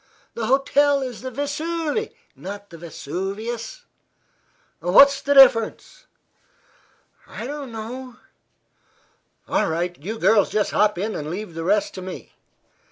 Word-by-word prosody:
The 225 Hz, -2 st, -3 dB
hotel 275 Hz, +2 st, +3 dB
is 250 Hz, -4 st, -6 dB
the 260 Hz, -, -5 dB
Vesuve, 315 Hz, -, -2 dB, 0.2 s
not 200 Hz, +1 st, -9 dB
the 165 Hz, -, -10 dB
Vesuvius." 205 Hz, -, -5 dB, 0.9 s
"What's 275 Hz, +11 st, +6 dB
the 285 Hz, -, +1 dB
difference?" 270 Hz, -, +4 dB, 1.2 s
"I -, -, -7 dB
don't 280 Hz, -1 st, -6 dB
know." 240 Hz, +3 st, -7 dB, 1.3 s
"All -, -, +1 dB
right; 175 Hz, +2 st, -2 dB
you 220 Hz, +5 st, -4 dB
girls 215 Hz, -2 st, +3 dB
just 210 Hz, -1 st, 0 dB
hop 210 Hz, -2 st, +2 dB
in, 210 Hz, +4 st, -2 dB
and 150 Hz, 0 st, -5 dB
leave 185 Hz, +1 st, -6 dB
the 165 Hz, 0 st, -5 dB
rest 205 Hz, +4 st, +1 dB
to 185 Hz, -, -7 dB
me." 185 Hz, 0 st, -9 dB
225 Hz, 125 wpm, -22 LUFS, 195-275 Hz, 1.3 s, What's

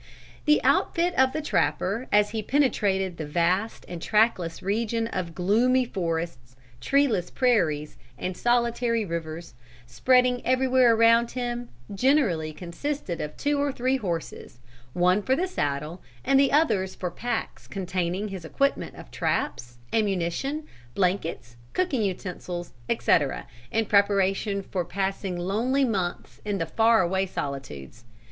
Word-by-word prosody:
The 300 Hz, -1 st, +5 dB
outfit 345 Hz, +1 st, +2 dB
of 265 Hz, -4 st, +3 dB
the 310 Hz, -, -3 dB
trapper 230 Hz, -4 st, 0 dB
as 210 Hz, 0 st, +4 dB
he 220 Hz, -1 st, -2 dB
penetrated 200 Hz, -, +1 dB
the 155 Hz, -, -4 dB
vast 175 Hz, +8 st, 0 dB
and 175 Hz, -2 st, -7 dB
trackless 200 Hz, -6 st, +1 dB
region 225 Hz, +3 st, 0 dB
of 185 Hz, -7 st, -4 dB
gloomy 240 Hz, +8 st, +3 dB
forests, 165 Hz, -, -4 dB, 0.2 s
treeless 235 Hz, -, +1 dB
prairies, 165 Hz, -, +1 dB, 0.2 s
and 185 Hz, 0 st, -4 dB
solitary 235 Hz, -1 st, +1 dB
rivers, 165 Hz, -1 st, -5 dB, 0.3 s
spreading 250 Hz, -, +2 dB
everywhere 255 Hz, -2 st, +4 dB
around 230 Hz, +1 st, +5 dB
him, 245 Hz, -1 st, -4 dB, 0.2 s
generally 200 Hz, -, +2 dB
consisted 180 Hz, -, -4 dB
of 150 Hz, 0 st, -6 dB
two 290 Hz, 0 st, 0 dB
or 285 Hz, 0 st, +1 dB
three 260 Hz, +1 st, 0 dB
horses, 170 Hz, -, -5 dB, 0.3 s
one 180 Hz, +3 st, +3 dB
for 260 Hz, +5 st, +1 dB
the 350 Hz, +6 st, 0 dB
saddle 150 Hz, -, -3 dB, 0.2 s
and 270 Hz, 0 st, +4 dB
the 275 Hz, -1 st, +4 dB
others 210 Hz, -12 st, +2 dB
for 180 Hz, -2 st, -4 dB
packs 240 Hz, +7 st, -4 dB
containing 185 Hz, +1 st, -2 dB
his 190 Hz, -3 st, -7 dB
equipment 275 Hz, +12 st, -1 dB
of -, -, -12 dB
traps, 120 Hz, 0 st, -2 dB, 0.2 s
ammunition, 210 Hz, -, -1 dB, 0.3 s
blankets, 170 Hz, -10 st, -1 dB, 0.2 s
cooking 330 Hz, -10 st, 0 dB
utensils, 180 Hz, -2 st, -4 dB, 0.2 s
etc., -, -, +1 dB, 0.2 s
in 225 Hz, +9 st, 0 dB
preparation 200 Hz, 0 st, +2 dB
for 185 Hz, -1 st, -3 dB
passing 195 Hz, 0 st, -3 dB
lonely 230 Hz, +10 st, +1 dB
months 190 Hz, -7 st, -3 dB
in 205 Hz, -1 st, -2 dB
the 165 Hz, -, -1 dB
far 225 Hz, +5 st, +3 dB
away 190 Hz, +2 st, 0 dB
solitudes. 120 Hz, -, -6 dB
200 Hz, 130 wpm, -26 LUFS, 175-245 Hz, 0.3 s, The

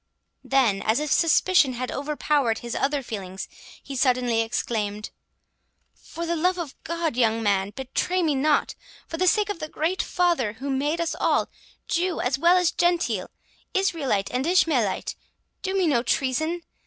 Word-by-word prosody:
Then, 245 Hz, -8 st, +2 dB
as 220 Hz, +4 st, +1 dB
if 300 Hz, -1 st, -3 dB
suspicion 330 Hz, -4 st, +4 dB
had 250 Hz, +1 st, -4 dB
overpowered 285 Hz, -4 st, 0 dB
his 235 Hz, -, -4 dB
other 280 Hz, 0 st, 0 dB
feelings, 190 Hz, -5 st, -6 dB, 0.4 s
he 275 Hz, -, -7 dB
suddenly 245 Hz, -3 st, +2 dB
exclaimed, 215 Hz, -2 st, -2 dB, 0.8 s
"For 335 Hz, -, -7 dB
the 340 Hz, 0 st, -1 dB
love 365 Hz, +3 st, +1 dB
of 330 Hz, -6 st, -5 dB
God, 335 Hz, -4 st, -2 dB
young 225 Hz, -2 st, +2 dB
man, 200 Hz, -2 st, +1 dB
betray 265 Hz, -, -1 dB
me 310 Hz, -3 st, +2 dB
not—for 300 Hz, +3 st, -1 dB
the 370 Hz, +2 st, +1 dB
sake 420 Hz, +2 st, +3 dB
of 410 Hz, -, -3 dB
the 310 Hz, -, -5 dB
Great 335 Hz, +5 st, -1 dB
Father 340 Hz, -, +1 dB
who 275 Hz, +5 st, -5 dB
made 290 Hz, +5 st, 0 dB
us 335 Hz, -1 st, -1 dB
all, -, -, +1 dB, 0.4 s
Jew 350 Hz, +1 st, 0 dB
as 265 Hz, +2 st, 0 dB
well 345 Hz, +3 st, +5 dB
as 360 Hz, -2 st, +2 dB
Gentile, 350 Hz, 0 st, 0 dB, 0.5 s
Israelite 300 Hz, -, 0 dB
and 255 Hz, +4 st, -1 dB
Ishmaelite—do 330 Hz, -, -1 dB
me 375 Hz, -, +2 dB
no 275 Hz, -7 st, +3 dB
treason! 315 Hz, +7 st, -1 dB
285 Hz, 155 wpm, -25 LUFS, 240-340 Hz, 0.8 s, well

